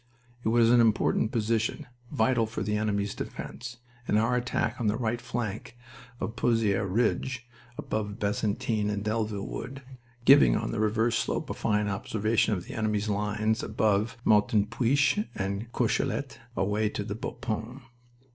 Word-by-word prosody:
It - - -1
was 115 0 +4
an 120 -1 +6
important 110 -1 +2
position, 115 0 0 0.3
vital 125 -5 +2
for 110 -3 -4
the 105 +1 -1
enemy's 100 -1 0
defense, 120 0 -7 0.3
and 105 - +3
our 115 +3 +2
attack 120 -1 -1
on 115 - +1
the 105 +1 +1
right 120 0 -1
flank 120 -1 -4 0.4
of - - -2
the 125 - -10
Pozieres 105 -4 +2
Ridge, 120 +4 0 0.3
above 105 -1 -3
Bazentin 105 0 0
and 105 -1 -2
Delville 105 -2 -1
Wood, 135 +4 -6 0.4
giving 140 +1 +7
on - - -1
the 115 - -2
reverse 110 +2 +2
slope - - -2
a - - -1
fine 105 0 0
observation 110 +2 +1
of 90 - -6
the - - -8
enemy's 105 -1 -1
lines 105 +2 0
above 105 +1 +1
Martinpuich 115 - +3
and 100 +4 -3
Courcellette 135 +3 -1 0.2
away 105 +3 +1
to 105 -1 -4
Bapaume. 115 +3 -5
110 Hz, 145 wpm, -28 LUFS, 105-120 Hz, 0.4 s, giving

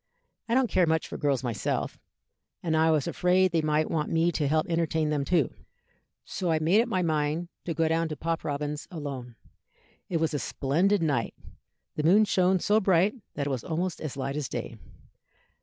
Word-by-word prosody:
I 235 - +2
don't 265 0 +4
care 185 -5 +2
much 160 0 +1
for - - -7
girls 140 -3 +1
myself, 120 -4 -2 0.6
and 160 -2 0
I 160 +1 +4
was 155 -3 +2
afraid 185 +1 +2
they 165 -2 +2
might 155 0 +1
want 155 -2 -1
me 165 +1 +2
to 150 -3 -1
help 155 +2 +2
entertain 160 -2 0
them 145 -2 0
too, 155 -2 +1 0.7
so 185 -3 -3
I 160 - +3
made 170 +8 +4
up 240 - -2
my 185 -6 0
mind 155 +1 0 0.2
to 165 - -3
go 165 -1 +2
down 165 +1 +1
to 155 - -4
Pop 165 +2 -2
Robins's 145 0 -3
alone. 140 - -6 0.7
It 170 - 0
was 160 -1 0
a 145 - 0
splendid 170 +10 +1
night; 140 -7 0 0.6
the 150 - 0
moon 200 +7 +5
shone 185 -1 +3
so 210 +4 +3
bright 190 0 +3 0.2
that 140 - -2
it 145 - -2
was 130 -4 -3
almost 175 +2 -2
as 150 -4 -5
light 135 +1 -3
as 150 -3 -3
day. - - -5
160 Hz, 195 wpm, -27 LUFS, 150-180 Hz, 0.7 s, moon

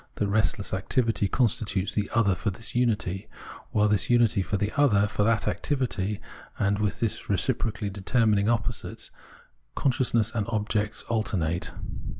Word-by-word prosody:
That 105 - 0
restless 100 -1 0
activity 110 +2 +1
constitutes 105 -4 0
the 105 -1 -1
" - - -10
other" 110 -5 +4
for 100 +4 -1
this 110 +4 -6
unity, 110 -5 0 0.4
while 105 0 +3
this 105 -2 +1
unity 120 -3 +4
is 90 - -5
the 105 +1 0
"other" 115 -9 +4
for 105 - -2
that 110 +1 +2
activity; 110 -8 -1 0.4
and 100 0 +1
within 105 -1 -1
these 115 -3 -2
reciprocally 110 0 0
determining 105 +1 +2
opposites 115 -1 -2 0.6
con 135 - +2
sciousness 120 -3 +1
and 105 -4 -1
object 105 -1 -1
alternate. 95 -7 -1
105 Hz, 150 wpm, -27 LUFS, 100-115 Hz, 0.6 s, other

